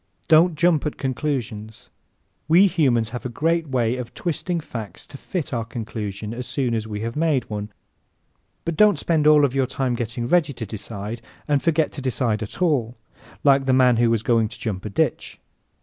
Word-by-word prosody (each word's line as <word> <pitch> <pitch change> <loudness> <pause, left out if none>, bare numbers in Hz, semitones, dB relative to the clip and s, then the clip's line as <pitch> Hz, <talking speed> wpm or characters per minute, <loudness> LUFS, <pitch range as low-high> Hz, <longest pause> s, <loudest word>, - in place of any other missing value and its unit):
Don't 160 +1 +5
jump 165 -1 +2
at 150 - -5
conclusions. 125 -6 -4 0.6
We 170 +5 +6
humans 130 - +2
have 125 - -5
a 125 - -3
great 165 +6 0
way 125 -2 0
of 125 -2 -7
twisting 175 +1 -2
facts 115 -9 -8
to - - -13
fit 155 +1 -4
our 115 -2 -1
conclusion 110 -2 -5
as 125 0 -6
soon 130 -2 -1
as 110 -1 -2
we 105 -1 -5
have 115 +1 -4
made 150 -5 +1
one. 105 0 -4 0.9
But 170 - -2
don't 210 +2 +5
spend 155 -3 +1
all 150 -2 +6
your 135 -1 +1
time 130 -1 -1
getting 120 0 -3
ready 150 +1 +2
to 115 -2 -6
decide 110 +1 -6 0.3
and 145 -2 +2
forget 160 +2 +1
to 140 - -7
decide 120 -4 -1
at 110 - -4
all, 125 -9 +1 0.5
like 135 -2 +4
the 130 - +4
man 125 -2 +5
who 120 0 +3
was 115 -1 +1
going 115 -2 +2
to 110 - -12
jump 100 -4 -4
a - - -3
ditch. 100 - -1
125 Hz, 190 wpm, -23 LUFS, 115-150 Hz, 0.9 s, We